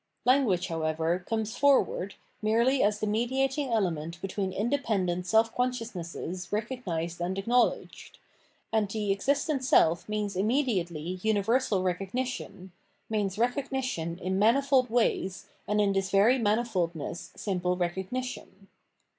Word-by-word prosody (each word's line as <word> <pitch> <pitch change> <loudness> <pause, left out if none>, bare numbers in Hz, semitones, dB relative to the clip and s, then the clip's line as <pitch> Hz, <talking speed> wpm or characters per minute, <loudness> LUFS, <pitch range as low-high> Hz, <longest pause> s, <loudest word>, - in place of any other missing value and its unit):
Language, 245 -9 +3
however, 165 +1 -1
comes 220 0 -2
forward 270 -8 +2 0.3
merely 235 +5 +3
as 210 0 +2
the 215 - -1
mediating 265 +6 0
element 170 -6 -1
between 195 +1 -3
independent 195 -6 -1
self 225 +3 +3
conscious 250 -2 -1
nesses 175 0 -6
recognised 190 -7 -3
and 180 +2 -2
acknowledged; 235 +5 0 0.6
and 215 -2 +2
the 210 -1 -1
existent 275 +6 0
self 170 -8 +3
means 210 -2 -2
immediately 185 - 0
universal 220 -1 +1
recognition, 195 +1 -3 0.4
means 205 -3 -1
recognition 245 - -1
in 185 +1 -2
manifold 260 +3 +3
ways 220 -5 0 0.2
and 210 +1 +1
in 200 -1 +3
this 195 -1 0
very 210 +7 +4
mani 220 +1 +2
foldness 170 -8 -3
simple 180 -3 -1
recognition. 190 +3 -4
205 Hz, 120 wpm, -28 LUFS, 180-245 Hz, 0.6 s, very